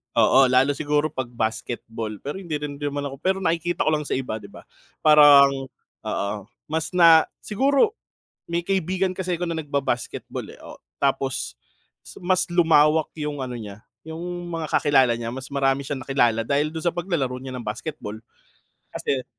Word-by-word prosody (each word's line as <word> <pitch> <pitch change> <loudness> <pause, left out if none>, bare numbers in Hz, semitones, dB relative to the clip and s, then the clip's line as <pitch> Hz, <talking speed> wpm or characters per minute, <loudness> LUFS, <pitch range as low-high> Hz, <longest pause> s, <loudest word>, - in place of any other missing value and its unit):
oo. 135 - +6
lalo 130 +3 +4
siguro 150 +1 +1
'pag 130 -5 -4
basketball. 115 -1 -4
Pero 145 +5 -4
hindi 175 -4 -10
rin 145 -1 -5
naman 145 0 -3
ako 135 - -7
pero 190 +3 +1
nakikita 170 +1 0
ko - - +4
lang 150 - -2
sa - - -7
iba, 130 -4 -3
'di 100 - -11
ba, - - -13 0.4
parang, 140 -3 +7 0.4
oo, 100 - -1 0.4
mas 160 0 -1
na 165 -2 +7 0.2
siguro, 280 - +2 0.5
may 170 0 0
kaibigan 185 0 0
kasi 180 -2 -2
'ko 175 - -2
na - - -1
nagbabasketball 140 -5 -3
eh, - - -15
oh, - - -10 0.2
tapos - - 0 0.5
si - - -12
mas 185 0 +2
lumawak 160 -2 +4
yung 150 -1 -3
ano 125 - -6
niya, 105 -2 -9 0.2
yung 160 +1 -7 0.3
mga 165 -2 -3
kakilala 135 -5 +3
niya 115 0 -4
mas 130 +2 -6
marami 135 0 +1
siyang 135 -1 -4
nakilala 120 -5 +2
dahil 145 +4 0
dun 160 - -4
sa 175 - +1
paglalaro 165 -8 -2
niya 130 0 -8
ng 120 - -8
basketball, 110 0 -5 0.7
kasi. 130 -2 -2
145 Hz, 165 wpm, -23 LUFS, 130-165 Hz, 0.7 s, parang